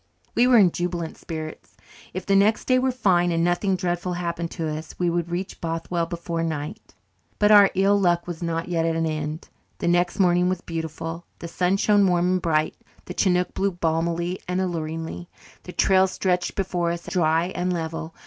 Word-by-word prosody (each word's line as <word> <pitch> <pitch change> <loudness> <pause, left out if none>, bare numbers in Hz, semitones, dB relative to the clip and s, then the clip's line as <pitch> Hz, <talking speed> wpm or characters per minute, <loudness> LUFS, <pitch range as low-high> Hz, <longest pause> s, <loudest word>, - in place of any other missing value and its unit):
We 245 +2 +4
were 250 -1 +6
in 190 -5 +6
jubilant 175 -2 -3
spirits. 155 -2 -8 0.3
If 185 0 -5
the 200 - +2
next 205 +3 +3
day 255 0 +3
were 260 0 +1
fine 180 -8 +2
and 165 0 +1
nothing 175 +3 +1
dreadful 180 0 -2
happened 170 -1 -3
to 165 -2 -4
us, 155 +1 -5
we 175 -1 +1
would 170 0 -1
reach 180 +2 -4
Bothwell 165 +1 -2
before 170 0 -3
night. 155 -2 -5 0.4
But 210 0 +4
our 205 -2 +8
ill 200 +2 +3
luck 175 -2 +2
was 175 -1 -6
not 165 -1 -2
yet 170 -2 0
at 165 0 0
an 165 0 0
end. 155 0 -4 0.3
The - - -3
next 175 +1 +1
morning 180 -1 +3
was 185 -1 -2
beautiful. 165 0 -5
The 170 - -7
sun 180 +3 +1
shone 205 -1 +4
warm 180 0 +2
and 185 0 +1
bright; 155 -2 +1 0.3
the 180 - -6
chinook 180 -2 +1
blew 195 0 0
balmily 170 +1 -1
and 180 +1 -1
alluringly; 165 -1 -4 0.4
the 180 - -7
trail 190 +1 +4
stretched 180 -1 -1
before 180 -3 -1
us 170 0 -5
dry 165 -1 +1
and 180 +1 -1
level. 165 -1 -4
175 Hz, 190 wpm, -24 LUFS, 165-185 Hz, 0.4 s, our